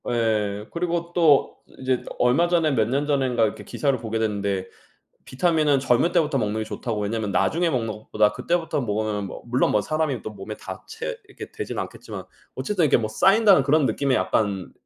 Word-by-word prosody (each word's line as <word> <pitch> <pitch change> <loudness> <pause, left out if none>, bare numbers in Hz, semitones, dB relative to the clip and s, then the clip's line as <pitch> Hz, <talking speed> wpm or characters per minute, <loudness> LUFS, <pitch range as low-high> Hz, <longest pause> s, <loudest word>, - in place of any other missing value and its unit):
예, 105 -3 0
그리고 170 0 -2
또 160 -5 +4 0.2
이제 130 -1 0
얼마 125 +8 +3
전에 170 -3 +2
몇 110 -5 +2
년 140 +3 0
전엔가 130 -6 +2
이제 - - -10
기사를 140 -3 -1
보게 115 0 -3
됐는데 100 -3 -1 0.6
비타민은 150 -1 +2
젊을 130 +5 +2
때부터 150 -3 +2
먹는 110 -2 -1
게 - - -1
좋다고, 110 0 -4
왜냐하면 105 0 -2
나중에 170 - +1
먹는 120 -6 -1
것보다 110 -1 0
그때부터 170 +5 -1
먹으면 105 -2 -2
뭐 - - -9
물론 125 +2 +1
뭐 105 - +2
사람이 155 -3 -1
또 - - -6
몸에 105 +1 -8
다 - - -9
채 465 +2 -5
이렇게 - - -10
되진 - - -5
않겠지만 - - -7 0.3
어쨌든 190 -6 0
이렇게 145 - +4
뭐 110 -2 -2
쌓인다는 195 - +5
그런 150 0 +3
느낌의 130 +3 +1
약간 100 -7 0
125 Hz, 400 characters per minute, -24 LUFS, 110-160 Hz, 0.6 s, 쌓인다는